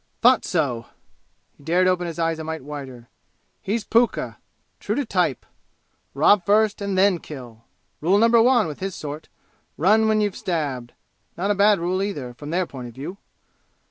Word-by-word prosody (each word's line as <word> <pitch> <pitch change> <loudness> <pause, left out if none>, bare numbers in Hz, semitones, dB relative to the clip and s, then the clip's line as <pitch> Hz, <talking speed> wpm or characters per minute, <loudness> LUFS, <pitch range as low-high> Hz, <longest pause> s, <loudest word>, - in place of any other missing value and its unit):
"Thought 250 0 +6
so!" 130 - -1 0.7
He - - -21
dared 175 +4 +2
open 180 -1 +1
his 165 - -6
eyes 165 -1 0
a - - -4
mite 160 -2 -5
wider. 135 -5 -8 0.5
"He's 215 +3 -2
pukka 230 +2 +1 0.4
true - - -2
to 285 - -1
type! 180 - 0 0.7
Rob 175 +7 +4
first 210 +2 +2
and 200 -1 -2
then 190 -2 +4
kill! 120 -7 -11 0.3
Rule 180 +6 +3
number 230 +1 +5
one 240 -2 +4
with 150 -2 -6
his 190 -1 -4
sort, 150 +1 -7 0.5
run 215 +7 +4
when 215 0 +3
you've 205 -2 0
stabbed! 140 -9 -3 0.4
Not 195 +4 0
a - - +4
bad 205 +1 +4
rule 180 +3 -1
either, 145 -12 -4
from 145 +4 -9
their 180 +3 0
point 130 -6 -8
of 120 - -12
view!" 170 +9 -7
175 Hz, 175 wpm, -23 LUFS, 145-205 Hz, 0.7 s, Thought